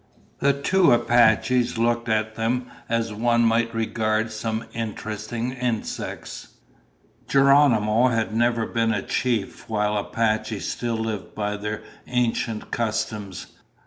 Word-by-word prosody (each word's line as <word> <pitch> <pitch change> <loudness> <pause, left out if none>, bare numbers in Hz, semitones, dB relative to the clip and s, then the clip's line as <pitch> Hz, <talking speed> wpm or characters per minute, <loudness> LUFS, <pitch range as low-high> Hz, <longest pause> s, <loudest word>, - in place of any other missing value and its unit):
The 140 0 +3
two 170 +4 +3
Apaches 120 0 +3
looked 115 0 +1
at 110 0 0
them 120 +3 -1 0.2
as 115 -1 0
one 120 +2 +2
might 115 0 +2
regard 110 -1 0
some 110 +1 -3
interesting 115 +1 -4
insects. 125 -3 -4 0.7
Geronimo 130 -5 +4
had 115 -4 0
never 115 0 +2
been 115 0 0
a 100 - -2
chief 115 -6 -2
while 105 -1 0
Apaches 110 0 -1
still 120 -2 -2
lived 110 -3 -4
by 105 -1 -2
their 105 +1 -4 0.2
ancient 120 -2 -1
customs. 110 -4 -3
115 Hz, 115 wpm, -24 LUFS, 110-120 Hz, 0.7 s, Geronimo